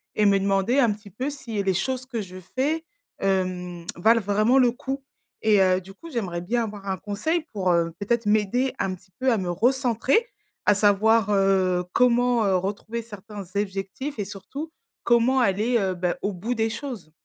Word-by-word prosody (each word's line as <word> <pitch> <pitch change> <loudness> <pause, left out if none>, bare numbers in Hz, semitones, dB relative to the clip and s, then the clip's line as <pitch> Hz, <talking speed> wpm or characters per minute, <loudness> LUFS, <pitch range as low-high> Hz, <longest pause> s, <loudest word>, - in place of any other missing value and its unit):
et 210 - +3
me 200 -1 +5
demander 195 +6 +2
un 240 -5 +4
petit 205 -1 -9
peu 255 +9 -3
si 235 -7 -4
les 195 -1 +1
choses 255 +6 -2
que 240 -3 -3
je 185 -3 -7 0.2
fais, 300 +5 0 0.4
hem, 185 -3 -1
valent 225 +6 +4
vraiment 215 +5 +3
le 250 -2 +5
coup 270 +2 -5 0.4
et 215 -2 +5
heu, 185 0 +3
du 190 +1 -13
coup 330 +10 -11
j'aimerais 190 - -3
bien 230 +7 0
avoir 205 -2 -8
un 190 -1 -1
conseil 305 - -2
pour, 190 -4 0
heu, 170 -1 +2
peut-être 230 +2 0
m'aider 215 +5 +2
un 195 -1 -1
petit 185 +1 -14
peu 260 0 +2
à 230 - +2
me 185 -2 -3
recentrer, 250 - +2 0.4
à 205 - +6
savoir, 210 +1 +3
heu, 190 -2 +3
comment, 245 -2 +3
heu, 195 -1 +3
retrouver 205 +5 -3
certains 210 -2 -9
objectifs 200 +7 -3
et 205 - -1
surtout 215 - -7 0.3
comment 240 +2 +3
aller, 230 +1 +2
heu 190 -2 0
bah, 180 0 -1
au 200 - -1
bout 205 +6 -3
des 225 -1 0
choses? 225 - -6
210 Hz, 190 wpm, -25 LUFS, 190-245 Hz, 0.4 s, à